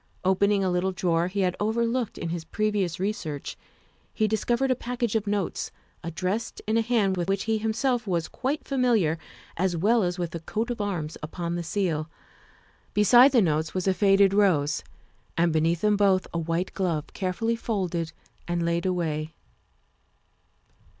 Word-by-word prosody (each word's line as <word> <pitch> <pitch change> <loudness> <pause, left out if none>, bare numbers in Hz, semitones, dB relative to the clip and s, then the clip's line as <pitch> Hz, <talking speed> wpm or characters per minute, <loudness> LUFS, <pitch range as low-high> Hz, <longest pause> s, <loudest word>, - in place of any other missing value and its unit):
Opening 195 +2 +3
a 185 - +1
little 180 +2 +1
drawer 175 -2 +1
he 195 +2 -2
had 185 -1 +1
overlooked 230 +2 0
in 170 - -4
his 170 -1 -3
previous 205 -3 -1
re 195 +3 +1
search, 155 - -6 0.6
he 215 - +1
discovered 240 +5 +1
a - - +3
package 240 -2 -2
of 215 -1 0
notes, 200 -3 -1 0.3
addressed 185 +7 -3
in 220 - 0
a 230 - +4
hand 220 -5 +1
with 175 +1 -2
which 195 0 +1
he 220 -1 0
himself 230 +2 0
was 170 -3 0
quite 275 +3 -3
familiar 230 - +2 0.4
as 180 0 +1
well 220 +7 +3
as 180 -1 -1
with 175 -2 -3
the 170 - -5
coat 220 +8 -3
of 235 - -3
arms 175 -7 -3
upon 170 +2 -4
the 175 - -2
seal; 165 -3 -1 0.9
beside 240 +6 +7
the 240 -5 +5
notes 160 -1 0
was 185 0 -1
a 190 - +4
faded 195 0 +4
rose 170 -7 +2 0.5
and 170 -1 +3
beneath 165 +2 +1
them 210 -1 +3
both 195 -2 +3
a 170 - 0
white 165 +3 -2
glove, 170 -6 -1
carefully 205 +5 -1
folded 180 -8 -2 0.4
and 175 -1 -1
laid 170 +2 0
away. 160 -3 -2
190 Hz, 170 wpm, -26 LUFS, 170-220 Hz, 0.9 s, beside